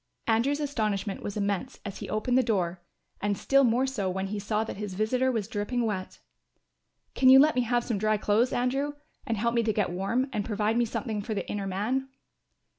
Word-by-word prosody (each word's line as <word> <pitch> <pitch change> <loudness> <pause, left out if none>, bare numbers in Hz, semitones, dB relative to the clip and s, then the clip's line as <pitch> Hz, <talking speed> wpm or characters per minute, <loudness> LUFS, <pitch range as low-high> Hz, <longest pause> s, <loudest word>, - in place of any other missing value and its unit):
Andrew's 240 +6 +2
astonishment 215 -9 -2
was 205 - -5
immense 205 +5 -2
as 200 -2 -6
he - - -6
opened 215 +4 0
the 260 - +6
door 185 -7 -1 0.4
and 205 -1 0
still 275 0 +3
more 245 +1 +3
so 240 -8 -2
when 190 +1 -2
he 210 0 -3
saw 210 +2 0
that 225 - -6
his 205 -2 -5
visitor 250 +6 +1
was 220 -5 -2
dripping 230 +2 -1
wet. 190 -4 -3 1.0
"Can 260 - +5
you 265 - +10
let 300 +3 +6
me 250 - +2
have 240 0 +1
some 225 -5 -2
dry 215 +1 +2
clothes, 215 +5 +2
Andrew, 270 +4 0 0.3
and 225 - 0
help 235 +3 0
me 235 - +3
to 225 -1 +1
get 205 -3 0
warm, 195 +9 0
and 210 -2 -1
provide 210 +1 0
me 240 0 +3
with - - -8
something 220 -4 -3
for 215 +1 -4
the - - -3
inner 200 -1 -3
man?" 235 +8 -1
220 Hz, 215 wpm, -28 LUFS, 205-250 Hz, 1.0 s, you